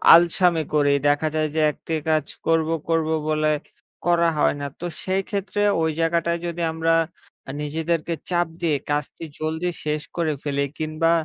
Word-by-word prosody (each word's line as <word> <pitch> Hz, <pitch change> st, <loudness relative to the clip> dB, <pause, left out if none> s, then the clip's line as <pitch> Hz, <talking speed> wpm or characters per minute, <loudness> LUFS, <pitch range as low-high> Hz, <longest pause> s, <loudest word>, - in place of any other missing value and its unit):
আলসামি 170 Hz, -1 st, +4 dB
করি। 145 Hz, -1 st, +4 dB, 0.2 s
দেখা 145 Hz, +2 st, +3 dB
যায় 155 Hz, 0 st, +2 dB
যে, 160 Hz, -, +2 dB
একটি 165 Hz, -, -7 dB, 0.2 s
কাজ 155 Hz, -2 st, +2 dB, 0.2 s
করবো, 165 Hz, 0 st, +2 dB, 0.2 s
করবো 160 Hz, -1 st, +2 dB, 0.2 s
বলে 155 Hz, 0 st, +2 dB, 0.5 s
করা 170 Hz, -1 st, +4 dB
হয় -, -, +3 dB
না। -, -, -2 dB
তো 175 Hz, -, -5 dB, 0.2 s
সেইক্ষেত্রে 195 Hz, +2 st, -1 dB, 0.2 s
ওই 160 Hz, -, +2 dB
জায়গাটায় 170 Hz, +1 st, +1 dB
যদি 170 Hz, 0 st, -4 dB
আমরা 165 Hz, +1 st, +1 dB, 0.6 s
আ -, -, -2 dB
নিজেদেরকে 160 Hz, +2 st, -1 dB, 0.2 s
চাপ 175 Hz, -1 st, +2 dB
দিয়ে 160 Hz, -3 st, +2 dB
কাজটি 145 Hz, +2 st, -2 dB, 0.2 s
জলদি 160 Hz, +3 st, -1 dB, 0.2 s
শেষ 150 Hz, 0 st, 0 dB
করে 165 Hz, -3 st, +1 dB
ফেলি 140 Hz, -1 st, 0 dB
কিংবা 155 Hz, +1 st, +1 dB
160 Hz, 155 wpm, -23 LUFS, 155-170 Hz, 0.6 s, আলসামি